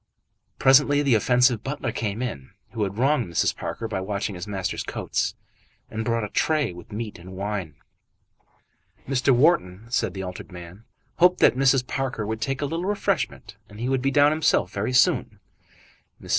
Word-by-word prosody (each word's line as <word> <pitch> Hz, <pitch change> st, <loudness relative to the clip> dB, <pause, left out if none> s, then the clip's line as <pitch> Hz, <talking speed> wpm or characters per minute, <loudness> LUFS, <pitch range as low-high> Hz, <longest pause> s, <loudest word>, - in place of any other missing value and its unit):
Presently 145 Hz, +2 st, +5 dB
the 140 Hz, -3 st, +3 dB
offensive 125 Hz, +1 st, +3 dB
butler 135 Hz, -3 st, -3 dB
came 110 Hz, 0 st, -3 dB
in, 70 Hz, -, -5 dB, 0.2 s
who 115 Hz, -, -5 dB
had 100 Hz, 0 st, -2 dB
wronged 135 Hz, -1 st, +2 dB
Mrs. 85 Hz, -, +1 dB
Parker 115 Hz, -, -5 dB
by 100 Hz, -4 st, -3 dB
watching 100 Hz, +1 st, -3 dB
his 90 Hz, +2 st, -7 dB
master's 95 Hz, -2 st, -3 dB
coats, -, -, -2 dB, 0.6 s
and 110 Hz, 0 st, -3 dB
brought 115 Hz, -1 st, 0 dB
a 105 Hz, -, -4 dB
tray 150 Hz, -, +1 dB
with 90 Hz, +4 st, -13 dB
meat 105 Hz, -2 st, -5 dB
and 90 Hz, +2 st, -11 dB
wine. 95 Hz, -5 st, -4 dB, 1.3 s
Mr. 135 Hz, 0 st, 0 dB
Wharton, 120 Hz, -, +3 dB
said 125 Hz, -, 0 dB
the 95 Hz, -, -4 dB
altered 90 Hz, +2 st, -8 dB
man, 90 Hz, +5 st, -11 dB, 0.3 s
hoped 180 Hz, +1 st, +4 dB
that -, -, +6 dB
Mrs. 135 Hz, -1 st, +3 dB
Parker 130 Hz, -5 st, -3 dB
would 110 Hz, +1 st, -4 dB
take 135 Hz, +4 st, -2 dB
a -, -, +1 dB
little 165 Hz, +5 st, -3 dB
refreshment, 205 Hz, +1 st, -2 dB
and 105 Hz, +1 st, -12 dB
he 120 Hz, +2 st, -2 dB
would 135 Hz, -1 st, +1 dB
be 135 Hz, -, +1 dB
down 145 Hz, +1 st, +5 dB
himself 155 Hz, -1 st, +2 dB
very 100 Hz, +5 st, -2 dB
soon. 125 Hz, -, +2 dB, 0.8 s
Mrs. -, -, -13 dB
115 Hz, 175 wpm, -24 LUFS, 100-135 Hz, 1.3 s, that